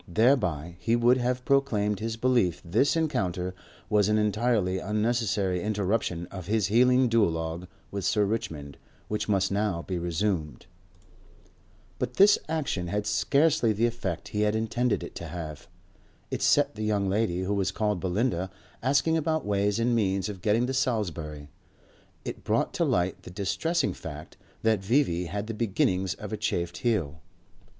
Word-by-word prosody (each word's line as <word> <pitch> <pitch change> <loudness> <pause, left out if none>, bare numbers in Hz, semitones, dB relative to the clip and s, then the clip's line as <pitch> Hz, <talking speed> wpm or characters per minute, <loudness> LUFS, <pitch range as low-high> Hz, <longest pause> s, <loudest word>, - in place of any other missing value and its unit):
Thereby 90 - +1
he 115 - +1
would 120 +2 +4
have 125 0 -1
proclaimed 105 -7 +1
his 115 +1 -3
belief 120 -8 +2
this 110 - +2
encounter 95 - -1 0.3
was 105 -1 +3
an 105 - +3
entirely 105 -3 +1
unnecessary 105 -4 0
interruption 100 -4 -1
of 95 -3 -7
his 110 -1 +1
healing 125 +2 +5
duologue 85 -6 0 0.2
with 100 -1 -4
Sir 105 +4 +2
Richmond, 80 -10 -4 0.3
which 105 0 -2
must 95 -2 +2
now 100 -4 0
be 90 -2 -3
resumed. 85 - -2 1.3
But 125 0 -3
this 205 +1 +6
action 140 - -1
had 105 +3 -2
scarcely 140 +1 +2
the 110 +3 +1
effect 115 -8 -3
he 105 - -1
had 105 0 +2
intended 115 +2 0
it - - -8
to - - -6
have. 80 -4 -7 0.6
It - - -2
set - - +3
the 110 - -5
young 105 -2 +1
lady 95 -2 0
who 100 +2 -1
was 100 -2 +1
called 105 0 -1
Belinda 95 0 0 0.3
asking 140 +5 +2
about 160 0 0
ways 100 0 +1
and 120 +1 +1
means 95 -3 +1
of 95 -4 -7
getting 110 +3 +2
to 130 - -2
Salisbury; 85 - -2 0.8
it - - -6
brought - - 0
to - - 0
light 90 +1 0
the - - -11
distressing 135 - -1
fact 75 -1 -9 0.3
that 110 -3 +2
V.V. 95 -6 +2
had 100 +5 -4
the 115 - -4
beginnings 95 -4 0
of - - -7
a - - -1
chafed 85 0 -2
heel. 85 - -1
105 Hz, 160 wpm, -27 LUFS, 90-120 Hz, 1.3 s, this